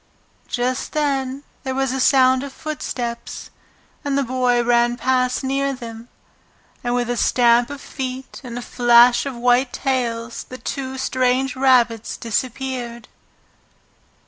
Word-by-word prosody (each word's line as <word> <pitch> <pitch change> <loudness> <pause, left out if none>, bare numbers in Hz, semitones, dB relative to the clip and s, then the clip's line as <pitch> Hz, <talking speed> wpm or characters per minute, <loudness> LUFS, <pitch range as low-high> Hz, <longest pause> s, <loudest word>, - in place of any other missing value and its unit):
Just 250 +1 -2
then 275 -2 -1 0.2
there 265 -1 -3
was 270 -1 0
a 265 - -2
sound 260 -1 +4
of 280 0 -6
footsteps, 245 -6 -5 0.5
and 280 -1 0
the 280 - +2
Boy 250 -1 +1
ran 240 0 +2
past 255 0 +1
near 275 +1 0
them, 235 -2 -9 0.7
and 240 0 0
with 245 -1 0
a 245 - -1
stamp 240 0 +3
of 285 -1 -7
feet 260 -2 -6
and 240 -2 -7
a 245 - -5
flash 240 +2 +5
of 270 - -5
white 245 +2 +2
tails 235 -4 -2
the 255 - -9
two 265 0 -5
strange 255 0 +1
rabbits 245 -4 +2
disappeared. 240 +1 -3
255 Hz, 135 wpm, -21 LUFS, 240-265 Hz, 0.7 s, flash